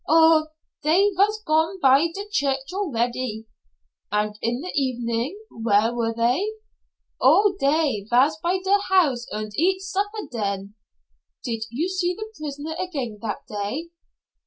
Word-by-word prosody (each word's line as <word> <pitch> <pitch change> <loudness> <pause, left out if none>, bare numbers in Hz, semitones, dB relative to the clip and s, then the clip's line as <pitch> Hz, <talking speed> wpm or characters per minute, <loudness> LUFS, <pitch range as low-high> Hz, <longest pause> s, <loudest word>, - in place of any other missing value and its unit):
"Oh, 320 0 +6 0.3
dey 370 +7 +4
vas 425 +3 +2
gone 320 +5 +1
by 275 +1 +5
der 400 - -4
church 275 -3 -1
already." 245 - -2 0.7
"And 210 0 0
in 240 +3 -1
the 360 - -5
evening 245 - -1
where 225 0 +2
were 230 -1 0
they?" 245 - +1 0.7
"Oh, 410 -1 +5
dey 275 -8 +1
vas 265 +6 +4
by 350 +2 +1
der 400 +1 +4
house 295 -11 +3
und 215 0 -4
eat 375 - +2
supper 405 +2 -3
den." 200 -3 -3 0.7
"Did 225 -3 -3
you 280 +10 -1
see 365 -1 -1
the 435 +2 -7
prisoner 300 +1 -5
again 275 - -4
that 220 -2 -4
day?" 215 +11 -4
285 Hz, 135 wpm, -24 LUFS, 230-365 Hz, 0.7 s, Oh